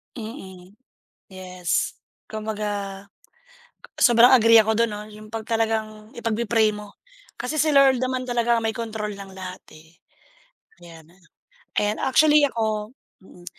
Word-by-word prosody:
Mm, 195 -6 -10 0.6
yes. 185 -2 -3 0.3
Kumbaga 205 -2 -5 0.9
sobrang 240 0 +6
agree 230 -1 +6
ako 220 0 +2
dun 230 0 +1
'no, 210 0 -7
yung 215 0 -13
pag 225 -1 -5
talagang 220 -1 -2
ipag-pe-pray 225 -1 0
mo. 210 -1 -11 0.4
Kasi 250 +6 -4
si 310 -1 +2
Lord 270 -3 +5
naman 255 0 -2
talaga 240 -1 +1
ang 225 - -7
may 220 - -1
kontrol 220 -3 -4
ng 195 -1 -10
lahat, 185 -1 -8
eh, 160 +1 -19 0.9
yan. 165 -2 -14 0.7
Ayan 210 +1 0
actually 300 +2 +4
ako 220 -4 -2 0.3
mm, 175 -2 -17
220 Hz, 130 wpm, -23 LUFS, 200-235 Hz, 0.9 s, sobrang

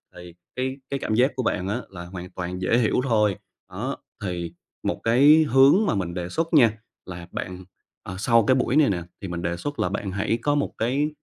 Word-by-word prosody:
Thì 90 -1 -11 0.2
cái 130 +1 -2
cái 140 - -2
cảm 110 - -1
giác 130 +5 +3
của 130 - -2
bạn 95 -5 -1
á, 110 +5 -2
là 85 -3 -9
hoàn 90 0 -8
toàn 90 0 -5
dễ 115 - +2
hiểu 115 -3 +2
thôi. 105 -6 +2 0.4
Đó, - - -4 0.3
thì 85 -3 -4 0.3
một - - -2
cái 145 +7 +6
hướng 135 - +6
mà 190 - +1
mình 90 -3 -2
đề 90 -1 -4
xuất 165 - -2
nha, 120 -8 +6 0.3
là 90 -2 -8
bạn, 90 0 -6 0.4
ờ, 90 - -7
sau 115 +2 +4
cái 130 - +5
buổi 130 0 0
này 150 -2 +5
nè 90 -3 -1 0.2
thì 100 - -5
mình 85 -1 -4
đề 85 0 -2
xuất 145 +10 -5
là - - +1
bạn 100 0 -3
hãy 105 +4 -1
có 145 0 +2
một 145 - -1
cái, 135 +6 0
105 Hz, 225 wpm, -24 LUFS, 90-130 Hz, 0.4 s, cái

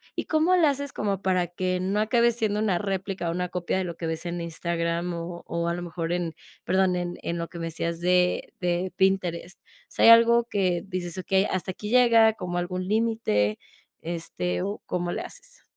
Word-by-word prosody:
y, - - -3
¿cómo 320 +3 +3
le 335 -3 +5
haces 285 -1 -1
como 200 -4 -2
para 185 -2 +1
que 185 +1 -2
no 195 +3 0
acabe 235 +2 +3
siendo 215 -3 0
una 210 -4 +1
réplica 195 -2 -3
o - - 0
una 180 +1 -2
copia 180 0 -2
de 190 - 0
lo 170 - -5
que 165 0 -4
ves 160 +1 -4
en 175 0 -3
Instagram, 170 +1 -2
o 170 +1 -6
o 170 0 -2
a 170 - 0
lo 175 - -5
mejor 170 -1 -4
en, 175 -2 -1 0.3
perdón, 185 0 +2
en 175 0 -3
en 170 - -3
lo 170 0 -3
que 170 - -9
me 165 - -3
decías 165 +1 -3
de 180 0 +2
de 180 +1 -1
Pinterest? 185 -2 0
¿O - - -56 0.3
sea, - - -2
hay - - +10
algo 235 +1 +7
que 185 -4 +1
dices: 180 -2 -4
"Okey, 190 +1 +2
hasta 185 -1 -2
aquí 210 +3 -7
llega, 230 -2 +6
como 180 -4 -4
algún 180 +1 -2
límite", 215 - +1 0.4
este, 125 - -3
o 205 - -4
cómo 175 -1 -2
le - - -3
haces? - - -11
180 Hz, 210 wpm, -26 LUFS, 170-205 Hz, 0.4 s, hay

